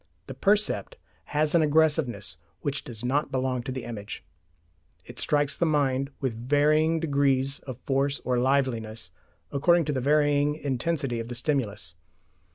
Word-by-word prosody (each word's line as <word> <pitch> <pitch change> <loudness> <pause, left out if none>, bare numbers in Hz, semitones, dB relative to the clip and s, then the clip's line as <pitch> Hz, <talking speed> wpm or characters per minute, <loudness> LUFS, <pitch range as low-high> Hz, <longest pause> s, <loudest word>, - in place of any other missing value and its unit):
The - - -7
percept 210 - +1 0.3
has 150 0 0
an 170 - +5
aggressiveness 150 - +2 0.2
which 140 0 -3
does 120 -1 -4
not 140 +3 0
belong 130 -1 -1
to 130 +2 -5
the 130 -1 -5
image. 105 -3 -7 0.8
It - - -9
strikes 145 -1 +1
the 170 - +1
mind 140 -3 +1
with 130 -4 -1 0.2
varying 155 +3 +3
degrees 140 -3 +1
of 130 -3 -5
force 140 +1 0
or 125 -1 +1
liveliness 125 -4 0 0.4
according 170 +4 +3
to 150 - -1
the 130 - -1
varying 145 +1 +3
intensity 135 -2 -2
of 115 - -5
the 120 - -6
stimulus. 110 - -1
140 Hz, 150 wpm, -27 LUFS, 125-150 Hz, 0.8 s, an